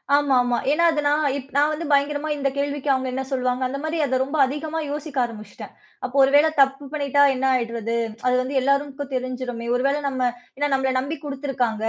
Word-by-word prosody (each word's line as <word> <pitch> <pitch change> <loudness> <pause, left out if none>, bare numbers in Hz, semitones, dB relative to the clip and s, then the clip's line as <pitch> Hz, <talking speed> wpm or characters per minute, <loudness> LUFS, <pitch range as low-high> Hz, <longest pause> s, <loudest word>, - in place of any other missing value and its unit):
ஆமாமா. 255 -4 +2
ஏன்னா 335 +3 +2
அது 305 -2 -1
நான் 295 +1 +2 0.3
நான் 295 +2 +3
வந்து 320 +2 -4
பயங்கரமா 290 +2 +1
இந்த 275 -1 0
கேள்விக்கு 285 0 -2
அவுங்க 260 0 -1
என்ன 265 - -2
சொல்வாங்க? 255 -1 0
அந்த 275 +2 -5
மாரி, 315 +1 -2
அத 260 -2 0
ரொம்ப 280 +4 -4
அதிகமா 305 +4 -4
யோசிக்க 295 -1 -6
ஆரம்பிச்சிட்டேன். 215 -3 -10 0.3
அப்போ 255 +1 -7
ஒருவேளை 290 +4 +5
தப்பு 275 +1 +2
பண்ணிட்டா 285 -1 +2
என்ன 265 0 -2
ஆயிடுறது? 230 -1 -2 0.3
அது 250 - +3
வந்து 260 +2 -4
எல்லாரும்க்கும் 280 +1 -1
தெரிஞ்சிருமே! 250 -2 -4
ஒரு 250 - 0
வேளை 285 +2 +1
நம்ம 260 -2 -3 0.4
ஏன்னா 290 +1 0
நம்மள 265 -1 +1
நம்பி 285 +4 -4
குடுத்திருக்கிறாங்க 265 -6 -2
275 Hz, 180 wpm, -23 LUFS, 255-290 Hz, 0.4 s, ஒருவேளை